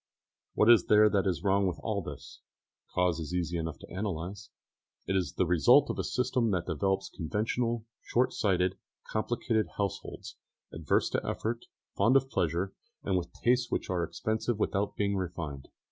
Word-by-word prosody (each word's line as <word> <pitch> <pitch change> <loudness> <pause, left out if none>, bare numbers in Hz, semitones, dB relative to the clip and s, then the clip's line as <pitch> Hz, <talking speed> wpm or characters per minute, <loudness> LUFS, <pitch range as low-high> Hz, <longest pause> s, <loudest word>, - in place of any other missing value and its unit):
What 105 - +4
is 115 - +6
there 105 0 +6
that 100 -1 +2
is 90 -2 -1
wrong 100 0 +3
with 90 - -3
all 105 -3 -1
this? 75 -4 -9 0.5
The - - -31
cause 90 -2 +2
is 80 +2 -4
easy 85 -1 -1
enough 80 -1 -4
to - - -12
analyse. 95 0 -4 0.6
It 95 - -1
is 90 -6 0
the 95 - +1
result 85 -4 +5
of - - -6
a - - 0
system 125 -2 0
which 90 -4 0
develops 95 +3 0
conventional, 115 +6 -2 0.2
short 125 +2 +1
sighted, 95 -2 +1 0.3
complicated 110 0 0
households, 100 -2 -4 0.4
averse 80 -2 +1
to - - 0
effort, 115 +1 -3 0.3
fond 125 +4 +4
of 135 0 +3
pleasure, 85 +4 0 0.3
and 95 - 0
with 90 -1 -2
tastes 125 0 +3
which - - -2
are 90 -2 0
expensive 110 +5 -2
without 100 -1 0
being 100 -1 0
refined. 85 -7 -5
95 Hz, 170 wpm, -30 LUFS, 85-110 Hz, 0.6 s, is